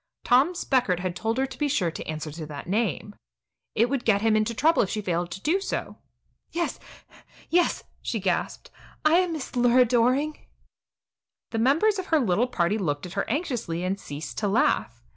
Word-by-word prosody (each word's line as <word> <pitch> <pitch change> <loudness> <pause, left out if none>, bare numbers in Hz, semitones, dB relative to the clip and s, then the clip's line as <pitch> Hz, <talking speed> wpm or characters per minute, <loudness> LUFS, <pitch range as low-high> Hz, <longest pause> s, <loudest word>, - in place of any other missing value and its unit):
Tom 270 +9 +4
Speckert 250 - +1
had 180 -1 -3
told 225 +5 -1
her 265 - +2
to 265 - -10
be 295 - +1
sure 200 - +1
to - - -6
answer 155 0 -4
to 155 0 -7
that 145 -2 -7
name. 210 +1 -1 0.6
It 230 +2 +4
would 265 -1 -2
get 205 -2 +2
him 220 -1 +3
into 215 +2 +1
trouble 320 +7 +4
if 195 - 0
she 215 - -2
failed 175 -3 -1
to 190 +2 -7
do 335 - +2
so. - - -4 0.5
"Yes, 340 +1 -2 0.7
yes," 350 0 +2 0.2
she 230 - -2
gasped; 185 -2 -2 0.3
"I 315 +2 +6
am 360 -3 0
Mrs. 270 -4 -6
Lura 245 +1 +5
Doring." 255 +6 +1 1.0
The 225 - -1
members 325 - +3
of 375 - -5
her 320 - +3
little 225 0 +2
party 205 -3 0
looked 145 -5 -2
at 180 - -8
her - - -2
anxiously 235 - -2
and 190 +2 -1
ceased 145 -1 -6
to 210 - 0
laugh. 120 - +1
230 Hz, 190 wpm, -26 LUFS, 180-275 Hz, 1.0 s, I